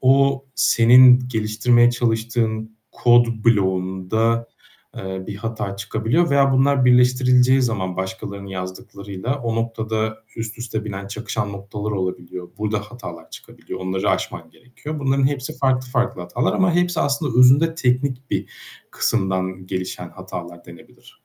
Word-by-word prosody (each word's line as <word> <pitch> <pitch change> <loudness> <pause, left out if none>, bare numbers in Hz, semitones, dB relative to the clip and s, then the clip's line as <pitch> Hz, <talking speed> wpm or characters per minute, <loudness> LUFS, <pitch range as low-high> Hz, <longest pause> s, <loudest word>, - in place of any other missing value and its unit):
o 135 +1 +3
senin 125 +2 +6
geliştirmeye 115 +2 +3
çalıştığın 110 -2 -1 0.2
kod 120 0 +4 0.2
bloğunda, 100 +2 +1 0.5
eee, 95 0 -5
bir 100 - -6
hata 110 -2 -4
çıkabiliyor. 115 - 0
Veya 140 -1 +4
bunlar 135 0 +3
birleştirileceği 125 +1 +4
zaman 95 -7 -2
başkalarının 100 +1 -5
yazdıklarıyla 95 +5 -6
o 115 -3 -3
noktada 110 -1 -2 0.2
üst 115 0 -5
üste 110 -2 -4
binen, 100 -2 -6
çakışan 105 0 -4
noktalar 100 +2 -6
olabiliyor. 90 -2 -4
Burda 105 0 -1
hatalar 115 +4 -10
çıkabiliyor. - - -10
Onları 95 +1 -1
aşman 80 - -3
gerekiyor. 125 - -9
Bunların 135 -1 +2
hepsi 135 -2 -3
farklı 130 -1 +1
farklı 125 - -1
hatalar 90 +8 -1
ama 185 -2 +2
hepsi 175 -1 +1
aslında 140 -3 0
özünde 140 +6 +5
teknik 130 -2 -1
bir - - -1 0.4
kısımdan 95 -1 -1
gelişen 90 -1 -5
hatalar 85 -1 -9
denebilir. 85 -1 -16
115 Hz, 125 wpm, -21 LUFS, 100-125 Hz, 0.5 s, senin